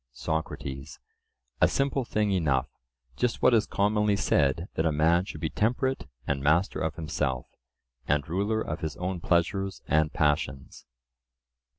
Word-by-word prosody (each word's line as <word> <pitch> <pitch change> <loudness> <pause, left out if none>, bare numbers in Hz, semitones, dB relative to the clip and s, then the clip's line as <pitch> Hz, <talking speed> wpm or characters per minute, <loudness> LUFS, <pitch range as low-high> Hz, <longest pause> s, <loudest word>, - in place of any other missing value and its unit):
SOCRATES: 70 -2 -4 0.6
A - - +7
simple 135 -1 0
thing 105 -2 0
enough; 75 -9 +1 0.5
just 125 -2 -1
what 125 - +6
is 110 -2 +3
commonly 105 +1 +2
said, 85 -2 +1
that 80 - 0
a - - +2
man 80 +4 +3
should - - -8
be 80 - -1
temperate 125 - 0 0.2
and 70 -1 -1
master 75 +7 +2
of 80 -1 -2
himself, 70 -5 -2 0.6
and 75 -1 +1
ruler 100 +6 0
of 75 - -4
his 80 -2 -4
own 90 0 -3
pleasures 95 +3 0
and 80 0 +2
passions. 75 -4 -1
85 Hz, 145 wpm, -28 LUFS, 75-100 Hz, 0.6 s, A